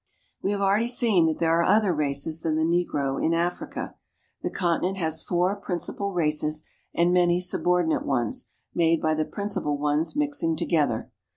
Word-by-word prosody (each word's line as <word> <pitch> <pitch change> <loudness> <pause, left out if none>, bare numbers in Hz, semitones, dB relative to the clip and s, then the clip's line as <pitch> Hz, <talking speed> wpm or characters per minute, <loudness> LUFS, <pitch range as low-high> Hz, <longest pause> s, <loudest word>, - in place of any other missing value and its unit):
We - - -1
have 200 0 -1
already 200 +4 +2
seen 225 -9 +3
that 160 - 0
there 165 0 +2
are - - +3
other 210 -1 +3
races 150 +1 -1
than 160 -1 0
the 160 - +1
negro 160 -5 0
in 165 - +2
Africa. 175 +1 -3 0.5
The - - -2
continent 180 +1 0
has 160 -3 0
four 180 +3 0
principal 200 +1 -4
races 155 -3 0 0.3
and 175 +1 +2
many 175 -1 +3
subordinate 180 -2 +1
ones, 120 -5 -1 0.2
made 165 -1 +3
by 155 0 +1
the 155 0 0
principal 200 -8 -2
ones 150 - 0
mixing 285 - 0
together. 140 -8 0
170 Hz, 165 wpm, -25 LUFS, 155-180 Hz, 0.5 s, seen